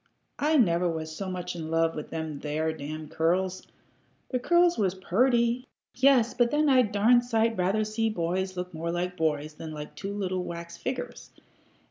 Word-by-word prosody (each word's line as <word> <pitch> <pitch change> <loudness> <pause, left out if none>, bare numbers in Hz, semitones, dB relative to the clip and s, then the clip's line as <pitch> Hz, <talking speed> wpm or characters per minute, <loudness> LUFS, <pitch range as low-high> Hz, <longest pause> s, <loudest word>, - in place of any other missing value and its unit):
"I 305 +2 +3
never 175 -7 +3
was 160 -1 -4
so 195 +1 -4
much 180 -1 -4
in 160 -2 -5
love 165 0 +2
with 150 - -6
them 160 -3 -4
there 155 +2 -1
damn 155 +1 -6
curls. 180 +4 0 0.6
The 250 - -1
curls 345 +5 +4
was 190 -3 0
purty 235 +6 +1 0.3
yes 255 -3 +4
but 240 -1 +2
then 300 +2 +2
I'd 255 -5 +4
a - - -14
darn 230 +4 +5
sight 230 -1 +1
rather 195 +3 +1
see 220 +1 -1
boys 185 0 -2
look 180 0 -4
more 165 +1 -4
like 180 +1 -2
boys 155 -2 -1
than 155 0 -8
like 150 0 -7
two 195 - -5
little 185 -2 -2
wax 170 -1 -7
figgers. 250 -1 -5
185 Hz, 180 wpm, -27 LUFS, 165-235 Hz, 0.6 s, darn